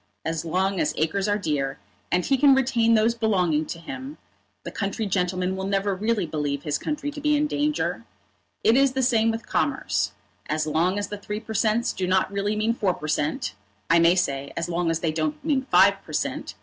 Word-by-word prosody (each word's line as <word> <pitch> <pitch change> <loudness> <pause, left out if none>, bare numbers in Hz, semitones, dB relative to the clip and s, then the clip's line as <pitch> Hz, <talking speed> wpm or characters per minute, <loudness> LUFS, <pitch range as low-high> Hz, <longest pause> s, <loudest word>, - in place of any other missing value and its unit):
As 160 -1 -2
long 185 +3 0
as 150 - 0
acres 175 +6 0
are 205 0 +2
dear, 145 -8 -2 0.3
and 180 0 +1
he 275 - +3
can 275 0 +6
retain 235 -3 +3
those 220 +1 +3
belonging 180 -9 +1
to - - -5
him, 265 - -8 0.5
the - - -6
country 200 +1 -2
gentleman 185 -1 0
will 190 0 -3
never 195 0 0
really 210 0 0
believe 145 -3 -3
his 150 -2 -1
country 295 -1 -3
to 290 0 -8
be 300 0 +3
in 300 - +2
danger. 295 - -1 0.6
It 225 - +5
is 275 0 +4
the 265 0 0
same 230 -2 +3
with 225 0 -3
commerce. - - 0 0.4
As 155 0 0
long 165 +5 +1
as 205 - -2
the 205 - -6
Three 210 +1 -4
per 220 0 -8
Cents. 220 +2 +1
do 185 - -2
not 190 +1 +2
really 200 +1 -1
mean 215 +2 +1
Four 195 -6 0
per 155 - -7
Cent., 150 0 -1 0.4
I 170 - +6
may 170 +1 +5
say 140 -6 -1
as 170 - -1
long 175 0 -1
as 165 0 -1
they 165 - 0
don't 155 -1 -1
mean 275 -4 0
Five - - +5
per - - -11
Cent. - - -3
195 Hz, 215 wpm, -25 LUFS, 165-230 Hz, 0.6 s, can